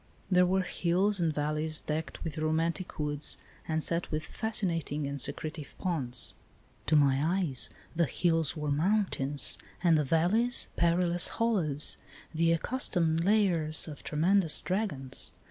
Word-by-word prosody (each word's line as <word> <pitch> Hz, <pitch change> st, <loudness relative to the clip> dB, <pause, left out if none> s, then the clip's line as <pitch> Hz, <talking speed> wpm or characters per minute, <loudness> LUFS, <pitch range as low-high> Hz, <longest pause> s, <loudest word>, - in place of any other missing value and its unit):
There 180 Hz, 0 st, +4 dB
were 190 Hz, +1 st, +1 dB
hills 185 Hz, +3 st, +1 dB
and 165 Hz, -2 st, +1 dB
valleys 155 Hz, +1 st, 0 dB
decked 155 Hz, -1 st, -5 dB
with 160 Hz, -1 st, -5 dB
romantic 165 Hz, +3 st, -2 dB
woods 150 Hz, -1 st, +5 dB, 0.3 s
and 160 Hz, -1 st, -1 dB
set 170 Hz, +1 st, -1 dB
with 155 Hz, 0 st, -3 dB
fascinating 170 Hz, -9 st, -1 dB
and 140 Hz, -1 st, -3 dB
secretive 155 Hz, -2 st, -3 dB
ponds. 135 Hz, -10 st, -1 dB, 0.5 s
To 155 Hz, -, +3 dB
my 140 Hz, -2 st, +4 dB, 0.2 s
eyes 150 Hz, -10 st, 0 dB, 0.3 s
the 170 Hz, -1 st, +2 dB
hills 165 Hz, -2 st, 0 dB
were 150 Hz, -1 st, -2 dB
mountains 145 Hz, -, +1 dB, 0.2 s
and 170 Hz, -2 st, +4 dB
the 150 Hz, -, +2 dB
valleys 180 Hz, -, +1 dB
perilous 170 Hz, +1 st, +1 dB
hollows, 175 Hz, -11 st, -1 dB, 0.3 s
the 165 Hz, +1 st, +2 dB
accustomed 165 Hz, -4 st, +1 dB
lairs 175 Hz, -7 st, +2 dB
of 150 Hz, -3 st, -9 dB
tremendous 165 Hz, +2 st, +2 dB
dragons. 160 Hz, -10 st, -2 dB
165 Hz, 130 wpm, -29 LUFS, 150-180 Hz, 0.5 s, woods